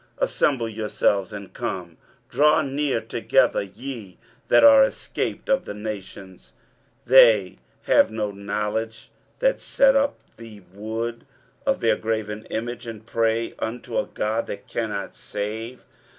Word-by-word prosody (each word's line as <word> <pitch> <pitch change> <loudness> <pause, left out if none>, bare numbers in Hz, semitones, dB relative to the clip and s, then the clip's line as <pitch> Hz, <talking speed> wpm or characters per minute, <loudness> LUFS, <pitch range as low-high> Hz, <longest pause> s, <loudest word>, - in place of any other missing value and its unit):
23:045:020 - - -2
Assemble 130 - 0
yourselves 105 -3 0
and 100 -2 -8
come; 90 -8 -5 0.3
draw 150 +2 +3
near 140 -2 -1
together, 110 - +2
ye 105 0 -8 0.3
that - - +5
are 280 -1 +9
escaped 270 - -3
of 270 0 +1
the 105 - -6
nations: 100 -3 -8 0.5
they 110 - +6 0.2
have - - +4
no 110 -2 -3
knowledge 105 +3 -4 0.3
that - - +1
set 275 0 +3
up 280 +1 +2 0.2
the 110 -3 -12
wood 110 +3 -5 0.4
of - - +1
their - - +3
graven 110 -1 -3
image, 120 +1 -5
and 110 -1 -8
pray 115 0 0
unto 115 +2 -5
a - - -2
god 110 +2 -2
that - - -7
cannot - - -4
save. 110 +4 -6
110 Hz, 135 wpm, -24 LUFS, 105-120 Hz, 0.5 s, are